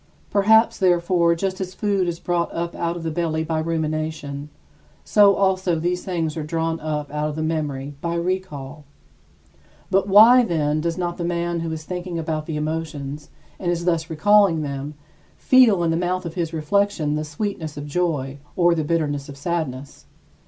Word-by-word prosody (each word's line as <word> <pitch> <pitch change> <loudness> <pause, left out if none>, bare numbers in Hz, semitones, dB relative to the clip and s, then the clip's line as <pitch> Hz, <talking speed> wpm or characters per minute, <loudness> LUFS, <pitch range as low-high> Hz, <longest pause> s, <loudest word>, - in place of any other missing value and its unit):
Perhaps, 220 +3 +4
therefore, 175 -2 +3
just 190 +2 -3
as 185 0 -5
food 200 -3 0
is 170 -1 -2
brought 175 -1 -1
up 170 +1 -3
out 170 0 -2
of 170 - -7
the 165 - -2
belly 160 -1 -1
by 160 0 -1
rumination, 155 -3 -3 0.5
so 200 -2 +5
also 190 -2 +1
these 180 +2 -1
things 165 -4 -2
are 160 - -3
drawn 165 +1 -2
up 150 -2 -3
out 150 0 -1
of 150 - -5
the 155 - -2
memory 145 -3 -2
by 170 0 -2
recall. 160 -5 -3 1.1
But 195 +1 +2
why, 225 +6 +8
then, 155 -6 0
does 170 +1 -2
not 175 -1 -2
the - - -2
man 170 0 -1
who 165 -1 -3
is 160 -1 -5
thinking 180 +1 -5
about 155 -1 -3
the 160 -2 -3
emotions, 150 -2 -4 0.3
and 175 - -2
is 170 0 -1
thus 165 -2 0
recalling 185 0 +4
them, 140 +1 -5 0.4
feel 235 -9 +5
in 165 - +1
the 165 - +1
mouth 180 +1 -1
of 165 - -5
his 170 -2 -2
reflection 160 0 0
the 155 0 -1
sweetness 155 0 -4
of 145 - -5
joy 145 -4 -2 0.2
or 175 -1 +4
the 160 -2 -1
bitterness 145 -3 -1
of 140 - -9
sadness? 140 -4 -4
165 Hz, 180 wpm, -22 LUFS, 155-180 Hz, 1.1 s, why